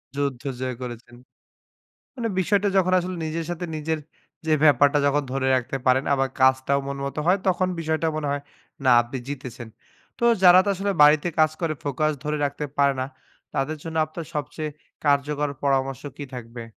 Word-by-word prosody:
যুদ্ধ 140 -3 -2 0.2
জয় 130 -1 -3
করেছেন। 120 -1 -8 1.0
মানে 235 -3 -2
বিষয়টা 205 +2 +2
যখন 185 -1 +3
আসলে 180 +1 -4
নিজের 160 +1 -3
সাথে 175 +1 -3
নিজের 155 +1 -2 0.5
যে 155 - +2
ব্যাপারটা 145 0 +5
যখন 145 +1 +2
ধরে 135 0 -1
রাখতে 130 +2 -2
পারেন 130 +2 +4
আবার 135 -1 +1
কাজটাও 130 +1 +3
মন 140 - -4
মত 140 - -5
হয় 180 +3 +4
তখন 185 0 +2
বিষয়টাও 160 0 0
মনে 150 -2 -2
হয় 145 0 -2 0.4
না 130 - +6
আপনি 120 +3 -6
জিতেছেন। 125 -4 -7 0.5
তো - - -3 0.2
যারা 180 0 +9
তো - - +1
আসলে 200 +2 -1
বাড়িতে 150 +3 +5
কাজ 155 0 +5
করে 165 -2 0
ফোকাস 150 +2 0
ধরে 150 0 -1
রাখতে 145 +1 -3
পারে 140 -1 +4
না 130 - -1 0.5
তাদের 150 +3 -1
জন্য 160 -1 -6
আপনার 155 +1 -8
সবচেয়ে 150 +1 -3 0.4
কার্যকর 145 +1 +1
পরামর্শ 135 -2 0 0.2
কি 145 - -5
থাকবে? 115 -1 -8
145 Hz, 170 wpm, -24 LUFS, 135-160 Hz, 1.0 s, যারা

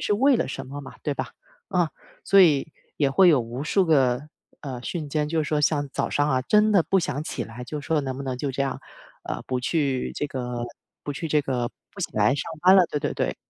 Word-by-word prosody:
是 - - +1
为 265 +5 +4
了 - - 0
什 130 - -6
么 140 +2 -7
嘛 135 - -10
对 145 - -1
吧？ - - -4 0.4
啊， 175 -4 +1 0.3
所 195 0 +6
以 155 -3 +3 0.3
也 145 - +3
会 180 +7 +6
有 140 -5 +4
无 120 +4 -5
数 190 +5 +2
个 135 -2 +2 0.3
呃， 130 -4 -6
瞬 155 +1 -4
间 150 +1 -1
就 160 0 0
是 150 - -4
说 150 -1 +1
像 145 -1 +1
早 - - -1
上 145 +1 +1
啊 130 -2 +1
真 210 +8 +3
的 195 -4 +5
不 195 - +2
想 145 -3 -2
起 - - -4
来， 120 +2 -9
就 150 +4 -5
说 150 +2 0
能 130 -2 -4
不 140 - -5
能 130 -2 -3
就 140 +1 -2
这 135 - -5
样 135 - -3 0.4
呃， - - -4
不 130 -1 -1
去 135 -2 0
这 145 - -1
个 125 -3 -4 0.4
不 145 - -3
去 160 +3 -5
这 150 0 +3
个 125 -3 -2 0.2
不 - - -10
起 - - -1
来 135 - +3
上 - - -2 0.2
班 185 +1 +7
了， 185 -2 +7
对 150 - -1
对 145 - -1
对， - - -1
145 Hz, 260 characters per minute, -25 LUFS, 130-160 Hz, 0.4 s, 班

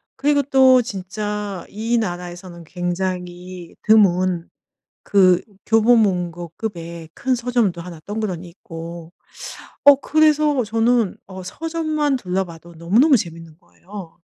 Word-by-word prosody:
그리고 285 0 +2
또 260 -2 +5
진짜 205 -1 -5
이 225 +3 -1
나라에서는 175 -3 -5
굉장히 180 0 -5
드문 185 -5 +3 0.6
그 185 -3 +4 0.2
교보문고 195 -7 +2
급의 170 -6 -6
큰 260 0 0
서점도 235 -8 0
1 170 -2 -9
덩그러니 200 -5 -4
있고. 170 -1 -9 0.7
어 285 - +10
그래서 300 -2 +2
저는 225 -1 +1
어 190 -1 -9
서점만 310 - -1
둘러봐도 180 -5 -4
너무너무 220 - +4
재밌는 165 -5 -7
거예요. 185 -2 -12
190 Hz, 245 characters per minute, -21 LUFS, 175-240 Hz, 0.7 s, 어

